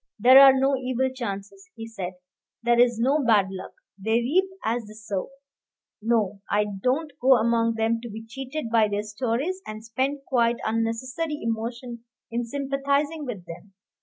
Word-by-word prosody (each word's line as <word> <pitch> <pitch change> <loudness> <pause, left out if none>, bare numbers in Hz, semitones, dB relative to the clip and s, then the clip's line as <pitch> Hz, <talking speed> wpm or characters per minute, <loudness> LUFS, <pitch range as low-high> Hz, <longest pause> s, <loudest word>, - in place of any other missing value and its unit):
"There 255 +5 +8
are 270 -1 +8
no 270 +1 +3
evil 260 0 -1
chances," 240 - -6
he 225 0 -7
said; 190 -5 -6 0.5
"there 240 0 +3
is 240 -1 +4
no 275 +6 +2
bad 205 -5 +3
luck; 190 0 -8 0.3
they 220 +3 -1
reap 265 +12 +3 0.2
as 225 0 -1
they 215 - -12
sow. 210 -3 -4 0.7
No, 210 -3 0
I 210 0 +2 0.2
don't 290 +6 0
go 260 +1 +6
among 230 0 +2
them 225 +1 0
to 235 - -7
be 220 +1 -8
cheated 265 +2 -6
by 225 -2 +4
their 205 0 -2
stories, 250 - -2
and 215 +1 -7
spend 265 +5 -1
quite 235 -2 +2
unnecessary 250 +8 -2
emotion 235 +1 -4 0.3
in 235 +1 -1
sympathizing 280 +4 -1
with 210 -9 -6
them. 190 +4 -11
235 Hz, 165 wpm, -25 LUFS, 220-265 Hz, 0.7 s, There